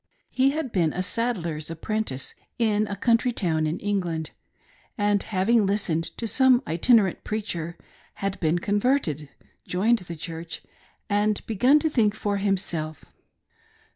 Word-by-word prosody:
He 265 +1 +3
had 285 -3 -3
been 170 -7 +1
a 185 - -1
saddler's 180 -8 -1
apprentice 165 -4 -3 0.2
in 215 -2 +2
a 200 - -3
country 235 +4 +2
town 160 -8 0
in 155 - -2
England, 175 -6 -2 0.7
and 205 -1 +2
hav 190 -3 -1
ing 230 -4 +4
listened 185 -5 0
to 230 - -3
some 260 +2 +4
itinerant 195 +3 +3
preacher, 175 -6 -4 0.4
had 195 -1 -3
been 160 +1 +2
converted, 205 - 0 0.4
joined 220 +6 +2
the 175 -2 -8
Church, 165 +1 -7 0.4
and 205 0 +1
begun 245 +7 +4
to 305 - +1
think 220 -8 +2
for 205 -2 -1
himself. 180 -6 -2
200 Hz, 140 wpm, -25 LUFS, 170-225 Hz, 0.7 s, ing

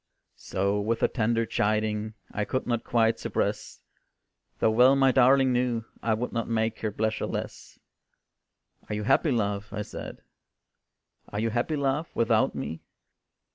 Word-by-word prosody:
So 100 +2 0
with 115 +2 -1
a - - +6
tender 115 0 0
chiding, 110 0 -1 0.2
I 105 - -2
could 130 +5 -2
not 120 -2 -1
quite 115 -1 +2
suppress, - - -3 0.7
Though 110 - +2
well 125 +4 +6
my 135 -1 +4
darling 130 +1 +5
knew 120 -2 0 0.2
I 110 -1 +1
would 120 +3 -3
not 115 -1 -2
make 110 -1 0
her 110 - -2
pleasures 110 +1 -1
less. - - -6 1.1
"Are 105 - -2
you 105 - -3
happy, 155 - +3
love?" 105 -4 -1
I 105 +1 -3
said, - - -9 1.1
"Are 105 - -4
you 115 +1 0
happy, 120 +7 0
love, 140 +3 -1
without 115 -1 +2
me?" 80 - -5
115 Hz, 150 wpm, -27 LUFS, 105-125 Hz, 1.1 s, a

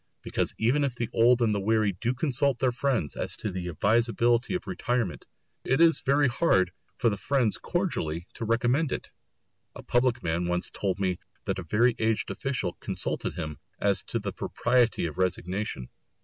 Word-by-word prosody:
Because - - -1
even 125 +6 +2
if 135 -3 -1
the 120 -2 -3
old 120 +1 +5
and 110 -2 +2
weary 110 -1 +2
do 115 +7 -2
consult 140 -1 +1
their 130 0 +2
friends 125 - 0
as - - -3
to 105 - -3
the 90 -1 -4
advisability 115 - +2
of 180 - -3
retirement, 120 - -2 0.4
it 135 +3 +1
is 165 -1 +5
very 140 +1 +3
hard 95 - +2 0.3
for 115 - +2
the 100 - -2
friends 115 -10 +1
cordially 120 - -2
to - - -6
recommend 120 +6 +1
it. - - -4 0.6
A - - -9
public 120 0 +1
man 85 +1 0
once 90 0 0
told 100 -1 -2
me 95 -2 0 0.3
that - - -1
a - - -5
very 115 +3 +3
aged 110 -1 0
official 125 -10 -2
consulted - - -3
him 75 -1 -5 0.2
as - - +2
to - - -2
the - - -4
propriety 120 -5 +1
of 80 +1 -5
resignation. 90 - -2
115 Hz, 175 wpm, -27 LUFS, 95-125 Hz, 0.6 s, old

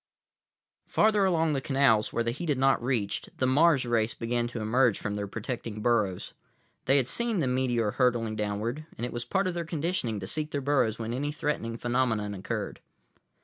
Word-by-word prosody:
———— - - -60
Farther 210 -2 +4
along 165 -4 +2
the 135 - -1
canals, 135 -6 +3
where 115 - 0
the 115 - 0
heat 160 +7 -5
had 145 - +2
not 135 -2 +3
reached, 120 -6 -2
the 130 - +1
Mars 140 +1 +4
race 115 -1 +1
began 120 0 -1
to 120 -1 -6
emerge 115 +1 +2
from 105 - -4
their 105 0 -3
protecting 110 +1 -5
burrows. 105 -5 0 0.5
They 135 +2 +4
had 130 -3 +1
seen 235 - 0
the 160 - +1
meteor 125 -4 +1
hurtling 120 -3 +1
downward, 110 +8 -3
and 120 - -2
it 125 - -5
was 120 0 -4
part 190 +10 0
of 185 - -1
their 170 0 -2
conditioning 160 - -2
to 95 - -5
seek 150 +9 -2
their 145 - -2
burrows 135 -6 +1
when 115 0 -4
any 145 +4 -2
threatening 145 -7 -2
phenomenon 120 -4 0
occurred. 95 -1 -4
125 Hz, 195 wpm, -28 LUFS, 110-145 Hz, 0.5 s, Farther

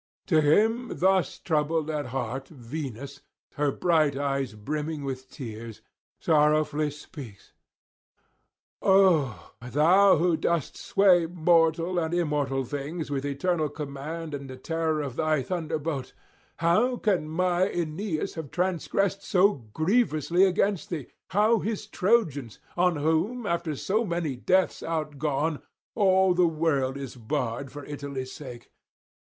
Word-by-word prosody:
To 160 -5 +3
him 220 +11 +2
thus 190 -4 +2
troubled 155 -1 0
at 150 -3 -3
heart 130 +1 -4
Venus, 140 0 -7 0.3
her 145 -1 +1
bright 155 -4 +2
eyes 135 -4 -1
brimming 150 +7 -4
with 130 -1 -5
tears, 115 -5 -8 0.4
sorrowfully 150 -1 +2
speaks: 140 - -11 1.3
'O 165 - +3
thou 160 +11 +5
who 170 0 +2
dost 170 -4 -1
sway 180 -4 +3
mortal 165 +1 +2
and 165 0 -1
immortal 145 -5 0
things 145 +4 -5
with 135 -1 -1
eternal 155 +2 0
command 150 +2 -6
and 140 -1 -6
the 130 - -8
terror 160 +2 -1
of 140 -3 -5
thy 155 -3 +1
thunderbolt, 155 -3 -3 0.4
how 215 +10 +2
can 185 -9 0
my 180 +3 +1
Aeneas 170 +1 -3
have 160 -4 -6
transgressed 190 +2 0
so 200 +2 +3 0.2
grievously 175 - +2
against 190 -1 0
thee? 155 -7 -5 0.2
how 215 +4 +3
his 215 +1 -3
Trojans? 180 - 0 0.2
on 180 0 +2
whom, 160 +11 0
after 170 -4 -1
so 210 - 0
many 170 - -2
deaths 185 +9 +1
outgone, 155 -1 -2 0.3
all 190 -3 +4
the 175 -1 +4
world 150 -5 0
is 135 -3 -7
barred 125 +1 -3
for 145 -1 -9
Italy's 140 -3 -6
sake. 125 -5 -10
155 Hz, 125 wpm, -27 LUFS, 140-180 Hz, 1.3 s, thou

